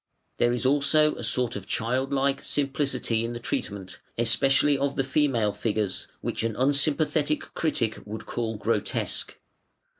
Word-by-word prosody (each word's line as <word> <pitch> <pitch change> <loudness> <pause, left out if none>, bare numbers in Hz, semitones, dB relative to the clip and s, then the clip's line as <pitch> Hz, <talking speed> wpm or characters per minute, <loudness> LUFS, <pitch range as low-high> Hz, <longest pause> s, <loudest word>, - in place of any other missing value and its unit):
There 120 - +4
is 125 +1 -1
also 145 +3 +4
a - - -7
sort 125 -2 0
of 100 - -6
child 130 +4 -1
like 140 0 +1
simplicity 135 -5 0
in 115 +1 -3
the 120 - -5
treatment, 100 -5 -4 0.2
especially 135 +5 +3
of 140 0 -1
the 135 - +1
female 130 -7 +1
figures, 105 -4 -2
which - - -2
an 115 -1 -1
unsympathetic 150 +3 +1
critic 115 -9 0
would 110 +1 -6
call 115 -2 -2
grotesque. 110 -2 -1
130 Hz, 145 wpm, -26 LUFS, 115-140 Hz, 0.2 s, There